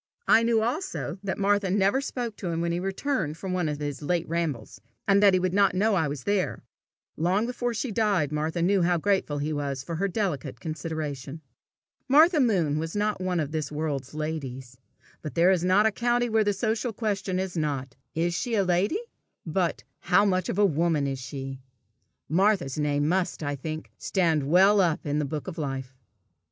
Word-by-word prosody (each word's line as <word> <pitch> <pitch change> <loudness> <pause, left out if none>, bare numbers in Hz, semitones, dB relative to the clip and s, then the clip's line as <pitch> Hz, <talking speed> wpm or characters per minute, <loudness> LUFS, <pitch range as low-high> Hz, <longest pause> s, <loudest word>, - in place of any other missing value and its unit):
I 225 - +6
knew 230 -1 +2
also 300 - -3
that 195 -2 -3
Martha 200 -1 +2
never 200 +6 +2
spoke 240 -5 -4
to 190 - -5
him 165 -1 -1
when 170 0 0
he 170 - -1
returned 190 - -2
from 185 +1 -4
one 180 -4 0
of 150 - -3
his 145 -1 -4
late 170 +3 -1
rambles, 150 - -3 0.3
and 200 0 +5
that 200 -2 +6
he - - +3
would 180 0 -1
not 200 -2 +3
know 215 +3 +2
I 165 -6 +2
was 140 -2 -5
there: 200 -2 -1 0.5
long 185 +7 +1
before 245 0 -2
she 225 +3 -2
died 200 -9 +1
Martha 155 +3 -1
knew 195 +1 +3
how 175 0 +3
grateful 190 -4 0
he 150 +2 -2
was 140 -3 -3
for 165 +2 -4
her 200 +4 +1
delicate 180 - -3
consideration. 155 -2 -5 0.7
Martha 310 +4 +6
Moon 175 - +2
was 165 +3 -4
not 210 -1 0
one 185 -1 0
of 150 -2 -2
this 155 -3 -3
world's 150 -3 -3
ladies; 135 -5 -5 0.5
but 150 -5 -7
there 175 +3 +5
is 180 -3 +1
a 205 +4 +4
country 240 +2 +1
where 220 -1 +3
the 205 - +2
social 220 +3 -1
question 200 -4 -2
is 190 -1 -3
not, 140 -4 -2 0.2
"Is 170 +2 0
she 235 +6 -1
a 200 - +3
lady?" 185 - +1 0.5
but, 170 +1 -1 0.2
"How 200 +3 +3
much 185 -3 +1
of - - -2
a 205 - +5
woman 165 -3 +1
is 135 -1 -2
she?" 135 0 -6 0.7
Martha's 180 -5 +2
name 145 0 +1
must, 180 -1 0
I 145 0 -2
think, 155 +3 -6
stand 160 -7 +1
well 195 +4 +6
up 165 -3 0
in 145 0 0
the 150 - 0
book 150 +3 -5
of 175 -2 -6
life. 135 -3 -4
175 Hz, 195 wpm, -26 LUFS, 150-205 Hz, 0.7 s, I